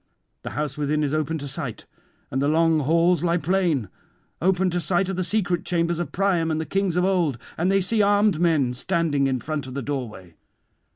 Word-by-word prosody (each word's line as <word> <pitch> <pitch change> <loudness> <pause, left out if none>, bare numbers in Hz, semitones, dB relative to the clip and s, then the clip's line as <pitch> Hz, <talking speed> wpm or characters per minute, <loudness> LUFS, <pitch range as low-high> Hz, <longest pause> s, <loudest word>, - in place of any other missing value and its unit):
The - - -6
house 150 -1 -3
within 150 +1 0
is 145 0 -1
open 155 +1 -1
to 145 -2 -6
sight, 135 - -6 0.5
and 135 - -1
the 140 - +2
long 160 +1 +3
halls 170 +4 +2
lie 170 0 +2
plain; 170 - 0 0.5
open 185 +1 +2
to 175 - 0
sight 175 +3 0
are - - -1
the 185 0 -1
secret 180 -3 0
chambers 170 -1 0
of 175 -5 -3
Priam 180 -4 +1
and 155 0 -1
the 160 - -3
kings 195 -2 -1
of 180 0 +2
old, 175 -9 +1 0.2
and 175 +4 +1
they 195 0 +3
see 215 +4 +2
armed 205 -3 +3
men 155 -8 +2
standing 150 -1 0
in 130 -1 0
front 145 +2 -4
of 130 - -8
the 140 - -3
doorway. 115 - -5
165 Hz, 210 wpm, -24 LUFS, 145-180 Hz, 0.5 s, long